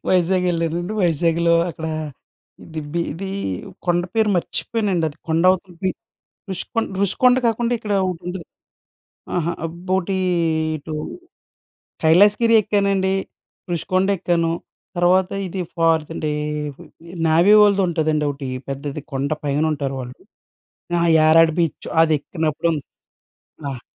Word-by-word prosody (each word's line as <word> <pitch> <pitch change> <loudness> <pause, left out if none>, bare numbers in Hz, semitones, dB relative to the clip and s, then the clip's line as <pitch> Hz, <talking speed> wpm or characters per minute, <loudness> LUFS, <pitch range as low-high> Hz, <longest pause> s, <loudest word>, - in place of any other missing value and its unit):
వైజాగ్ 185 0 +2
ఎళ్ళానండి. 170 +3 -2
వైజాగ్‌లో 170 0 +2 0.2
అక్కడా, 160 -1 -5 0.8
దిబీది 165 +4 -4 0.6
కొండ 175 0 +2
పేరు 220 -1 +3
మర్చిపోయానండి. 195 -1 -1
అది 145 - -13
కొండ 160 +1 +2
అవతలకి, 185 0 -2 0.6
రుషికొండ 205 +5 -2
రుషికొండ 250 +6 +3
కాకుండా 235 +1 0
ఇక్కడ 215 -2 -4
ఒకటి 180 -3 -4
ఉంటది, 180 -2 -6 0.9
అహా! 170 0 0
అబ్బోటీ 185 +3 -2 0.6
ఇటు, 155 +1 -7 1.1
కైలాసగిరి 205 +8 +5
ఎక్కానండి. 195 -2 +1 0.6
రుషికొండ 185 +3 0
ఎక్కాను. 170 -2 +1 0.5
తర్వాత 180 +1 +3 0.2
ఇది 185 +1 -4 0.2
ఫార్ద్ 165 -1 +2
డే, - - +1 1.0
నావీ 170 +6 +5
వాళ్ళది 200 -1 +4
ఉంటుందండి 155 -2 0
ఒకటి. 140 -2 -6 0.2
పెద్దది 140 +2 -4
కొండ 135 +1 -1 0.2
పైన 145 +2 +1
ఉంటారు 140 -2 -3
వాళ్ళు. 125 0 -8 0.8
అహా! 170 0 +2
యారాడ 160 +1 +6
బీచ్ 165 -3 -2
అది 160 -1 +3
ఎక్కినప్పుడు 160 +1 -2
ఉన్ 150 - -3 0.9
ఆహ్. 125 -2 -7
170 Hz, 110 wpm, -21 LUFS, 160-190 Hz, 1.1 s, యారాడ